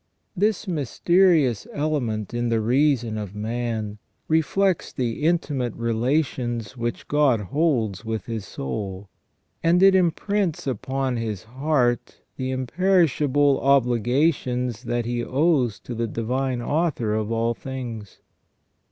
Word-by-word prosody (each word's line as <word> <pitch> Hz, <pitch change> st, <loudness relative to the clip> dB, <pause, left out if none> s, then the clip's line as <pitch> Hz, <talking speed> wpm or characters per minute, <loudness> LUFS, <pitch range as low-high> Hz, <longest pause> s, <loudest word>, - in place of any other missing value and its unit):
This 210 Hz, +2 st, 0 dB
mysterious 165 Hz, -, +2 dB
element 125 Hz, -9 st, -2 dB
in 120 Hz, 0 st, -1 dB
the 115 Hz, -1 st, +2 dB
reason 120 Hz, -1 st, +1 dB
of 105 Hz, -1 st, -6 dB
man 110 Hz, -1 st, -3 dB, 0.3 s
reflects 170 Hz, +4 st, +1 dB
the 125 Hz, 0 st, -3 dB
intimate 145 Hz, -8 st, 0 dB
relations 120 Hz, -1 st, -1 dB
which 120 Hz, -1 st, -4 dB
God 145 Hz, -6 st, +3 dB
holds 115 Hz, -, 0 dB
with 110 Hz, -1 st, -3 dB
his 115 Hz, -3 st, -4 dB
soul, 95 Hz, +5 st, -5 dB, 0.5 s
and 175 Hz, +3 st, +4 dB
it 195 Hz, 0 st, +7 dB
imprints 190 Hz, 0 st, +1 dB
upon 130 Hz, 0 st, -2 dB
his 110 Hz, -5 st, -3 dB
heart 130 Hz, 0 st, 0 dB, 0.2 s
the 130 Hz, -1 st, -3 dB
imperish 165 Hz, +5 st, +2 dB
able 145 Hz, -1 st, +3 dB
obligations 125 Hz, -1 st, +1 dB
that 120 Hz, 0 st, -1 dB
he 120 Hz, 0 st, -2 dB
owes 135 Hz, -5 st, +1 dB
to 125 Hz, -, -7 dB
the 115 Hz, 0 st, -2 dB
Divine 125 Hz, +3 st, -2 dB
Author 145 Hz, -8 st, 0 dB
of 110 Hz, 0 st, -1 dB
all 115 Hz, +1 st, +1 dB
things. 120 Hz, -5 st, -7 dB
125 Hz, 120 wpm, -24 LUFS, 115-150 Hz, 0.5 s, it